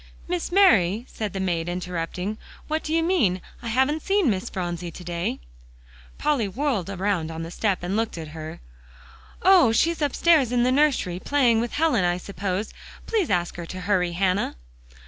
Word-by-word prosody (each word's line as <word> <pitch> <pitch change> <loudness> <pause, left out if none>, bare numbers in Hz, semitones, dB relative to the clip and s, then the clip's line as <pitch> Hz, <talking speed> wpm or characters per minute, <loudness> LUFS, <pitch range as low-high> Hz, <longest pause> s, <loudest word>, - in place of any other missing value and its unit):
"Miss 350 0 -2
Mary," 230 - +4
said 215 -2 -4
the 195 - -4
maid, 175 -3 -1
interrupting, 180 +3 -4 0.3
"what 315 +1 -1
do 305 - -5
you 325 0 +2
mean? 255 - +2 0.2
I 235 - -6
haven't 265 +7 +1
seen 390 - +2
Miss 195 +4 -3
Phronsie 175 -2 -4
to 180 - -10
day." 170 - -3 0.8
Polly 280 -8 +1
whirled 225 - -1
around 190 -4 -1
on 165 0 -5
the 165 - -7
step 195 -2 -1
and 180 +3 -2
looked 225 -4 -1
at 160 -2 -6
her. 155 0 -8 0.8
"Oh! 365 -10 +6
she's 325 +8 +1
upstairs 290 -2 +3
in 245 -1 +2
the 250 - +3
nursery, 260 -11 +2
playing 245 -3 +2
with 235 - -3
Helen, 295 - +2
I 175 0 +1
suppose. 195 +2 -4 0.3
Please 425 -7 0
ask 175 -2 0
her 170 -1 -6
to 185 +2 -6
hurry, 180 -2 +1
Hannah." 185 - 0
205 Hz, 175 wpm, -24 LUFS, 180-285 Hz, 0.8 s, Oh